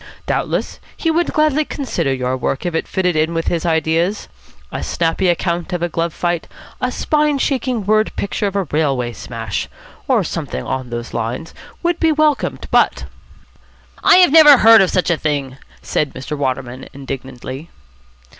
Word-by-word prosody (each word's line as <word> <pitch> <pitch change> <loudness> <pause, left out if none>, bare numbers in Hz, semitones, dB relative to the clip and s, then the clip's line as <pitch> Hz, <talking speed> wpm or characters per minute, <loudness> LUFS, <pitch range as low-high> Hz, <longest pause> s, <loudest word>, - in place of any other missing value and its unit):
Doubtless - - -2 0.2
he 325 - 0
would 340 +1 +1
gladly 305 -1 +2
consider 270 - -2
your 130 -1 -1
work 130 +3 -2
if 175 - -1
it 160 - -1
fitted 180 -2 0
in 160 +2 +1
with 165 - 0
his 170 0 -1
ideas. 165 +4 0 0.4
A - - -4
snappy 170 +2 0
account 175 0 -1
of 175 -1 -2
a 175 - 0
glove 165 +1 -1
fight, 175 0 -2 0.3
a - - 0
spine 300 -1 +1
shaking 255 -5 -1
word 215 +1 +2
picture 200 +1 -2
of 200 - -5
a 200 - +1
railway 140 -6 -1
smash, - - -5 0.4
or - - +3
something 65 - -4
on 130 -1 -4
those 120 0 -6
lines, 120 +8 -4 0.3
would 345 0 0
be 325 -1 +3
welcomed. 305 -2 0
But - - +2 0.5
" - - -31 0.2
"I - - +7
have 360 -5 +6
never 300 -3 +9
heard 225 -1 +7
of 190 - +3
such 180 -1 +1
a 170 - +1
thing," 140 -4 -2 0.3
said 150 - -1
Mr. 135 +3 -5
Waterman 130 -2 -3
indignantly. 135 +1 -7
170 Hz, 170 wpm, -18 LUFS, 135-225 Hz, 0.5 s, never